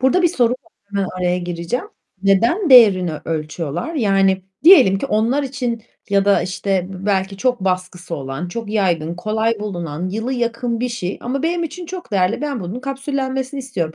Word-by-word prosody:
Burada 265 +8 +3
bir 345 - +5
soru 245 -8 +2
var, 255 - -8 0.2
hemen 200 -2 -1
araya 180 0 +1
gireceğim: 175 - -3 0.4
Neden 235 - +3
değerini 195 -9 +7
ölçüyorlar? 160 - -3
Yani 195 -6 +2 0.2
diyelim 195 - +8
ki 275 - -3
onlar 235 +5 +1
için 250 -4 -3 0.3
ya 200 0 +3
da 200 -1 +4
işte 185 0 -1
b 190 +2 -7
belki 195 -1 0
çok 250 +1 0
baskısı 180 -2 -2
olan, 135 +5 -5
çok 225 +3 -5
yaygın, 175 -6 0
kolay 220 +3 -1
bulunan, 175 -4 -4
yılı 225 +6 -3
yakın 235 -1 -1
bir 250 - 0
şey 200 -6 -4
ama 260 +4 -2
benim 340 +1 0
için 335 +2 -7
çok 365 -7 -8
değerli. 190 +4 +1
Ben 280 -6 -2
bunun 190 +8 -5
kapsüllenmesini 270 0 -3
istiyorum. 175 -12 -3
210 Hz, 170 wpm, -19 LUFS, 180-255 Hz, 0.4 s, diyelim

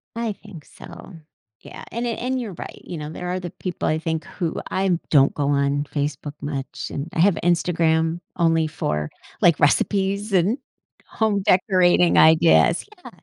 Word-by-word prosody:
I 230 -2 -2
think 195 -7 -13
so. - - -13 0.5
Yeah, - - -11
and 235 +1 -3
it 230 - -2
and 255 +1 -2
you're 225 -6 -5
right, - - -9
you 175 - -6
know, 150 -1 -6
there 180 +3 -6
are 180 +1 -2
the 175 -1 -6
people 180 +1 -5
I 155 - +1
think 160 0 -3
who 170 -4 -4
I 190 -2 +1
don't 140 -2 +4
go 145 -1 -1
on 140 0 +1
Facebook 145 0 -3
much, 140 -1 -5
and 140 +4 -4
I - - -3
have 185 +2 +4
Instagram 165 -1 +1 0.2
only 165 -2 +2
for, 75 - -3 0.3
like, 170 -4 +4
recipes 200 +7 +1
and 195 +6 +2 0.5
home 215 -3 0
decorating 185 -2 +3
ideas 160 +1 +5 0.2
Yeah, - - -9
170 Hz, 170 wpm, -22 LUFS, 155-190 Hz, 0.5 s, ideas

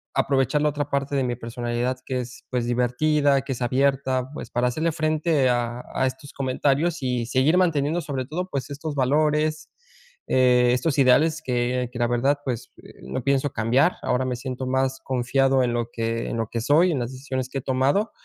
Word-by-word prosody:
aprovechar 135 +2 +1
la 150 - +3
otra 145 -1 -3
parte 140 0 -1
de 135 - +1
mi 120 -1 -1
personalidad 120 +1 -3
que 130 -1 -2
es, 125 0 -10
pues, 125 -2 -1
divertida, 135 +4 +2
que 140 - -5
es 125 - -4
abierta, 130 0 +1
pues, - - -7
para 120 +1 0
hacerle 160 +6 -1
frente 155 -2 +1
a 120 0 -1
a 130 - +1
estos 130 +2 -7
comentarios 140 +5 0
y 125 -2 -1
seguir 130 +6 +2
manteniendo 165 -2 +1
sobre 140 -4 -4
todo, 180 +7 -4
pues, 140 -3 -4
estos 145 +1 -5
valores, 150 +3 +1 0.6
eh, 125 -1 +4
estos 130 +4 0
ideales 150 +5 +4
que 125 -1 -1
que 125 - -8
la 120 - +2
verdad, 125 +4 +1
pues, 125 -2 -4 0.3
no 65 +1 -4
pienso 140 +1 +1
cambiar. 125 +10 +2
Ahora 125 +1 +1
me 125 -1 -1
siento 130 0 -5
más 130 0 0
confiado 130 +1 +2
en 120 -1 0
lo 120 -1 -2
que 115 0 -2
en - - -3
lo 115 -1 -1
que 115 - -3
soy, 160 +9 +4
en 145 - -1
las 120 0 -3
decisiones 130 -1 -4
que 135 - -5
he - - -2
tomado. 135 - +1
130 Hz, 195 wpm, -24 LUFS, 125-145 Hz, 0.6 s, eh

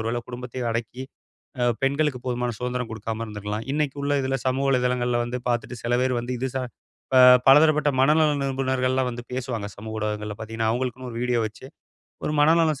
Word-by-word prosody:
ஒருவேளை 115 +2 -2
குடும்பத்தையே 125 0 -6
அடக்கி, 115 +2 -4 0.6
அ - - +2 0.2
பெண்களுக்குப் 135 -2 0
போதுமான 125 -1 -1
சுதந்திரம் 125 -1 -3
குடுக்காம 110 0 -4
இருந்துருக்கலாம். 105 +1 -5
இன்னைக்கு 145 -2 -1
உள்ள 145 0 +1
இதுல 135 0 -1
சமூக 130 +2 +1
வலைதளங்கள்ல 125 -2 +1
வந்து 125 +1 -4
பாத்துட்டு, 120 0 -2
சில 120 - -2
பேர் 130 0 +1
வந்து, 120 +2 -4
இது 130 0 -1
சா 130 - 0 0.5
ப - - +5 0.3
பலதரப்பட்ட 150 +1 +6
மனநல 150 +3 +4
நிபுணர்கள்லாம் 130 -1 0
வந்து 120 0 -7
பேசுவாங்க, 120 -5 -3
சமூக 110 +1 -7
ஊடகங்கள்ல 105 0 -3
பார்த்தீங்கன்னா, 110 0 -2
அவங்களுக்குன்னு 125 +1 -3
ஒரு 115 - -5
வீடியோ 125 -1 +1
வச்சு. 110 +4 -10 0.6
ஒரு - - -1
மனநலம் 155 -1 +4
125 Hz, 170 wpm, -24 LUFS, 115-135 Hz, 0.6 s, பலதரப்பட்ட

